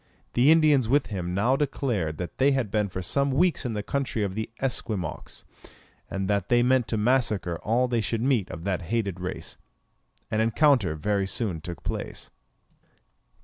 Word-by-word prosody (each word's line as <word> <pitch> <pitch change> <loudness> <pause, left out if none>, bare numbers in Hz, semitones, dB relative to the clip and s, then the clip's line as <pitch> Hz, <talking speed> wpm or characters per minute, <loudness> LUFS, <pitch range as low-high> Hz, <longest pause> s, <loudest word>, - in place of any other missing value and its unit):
The 125 +4 +4
Indians 150 -7 +4
with 145 +3 +3
him 90 -2 -3
now 120 +7 +3
declared 120 - -1
that 90 0 -6
they 140 +1 +4
had 125 -7 -1
been 105 -1 +1
for 95 0 -5
some 140 +9 +1
weeks 155 +2 +2
in 115 - -3
the 105 -1 -3
country 135 -3 -1
of 100 -2 -2
the 110 +2 -3
Esquimaux, 110 - -3 0.7
and 95 0 -2
that 100 0 0
they 120 0 +4
meant 130 -1 +3
to 110 - -1
massacre 105 -7 +1
all 120 +4 +1
they 120 -2 0
should 110 +3 -2
meet 125 -8 +1
of 85 -2 -7
that 95 -1 -1
hated 100 -1 -2
race. 90 -3 -5 0.7
An 110 - +1
encounter 115 - +3
very 100 +4 0
soon 95 -4 -1
took 85 +1 -7
place. - - -5
110 Hz, 175 wpm, -26 LUFS, 95-130 Hz, 0.7 s, The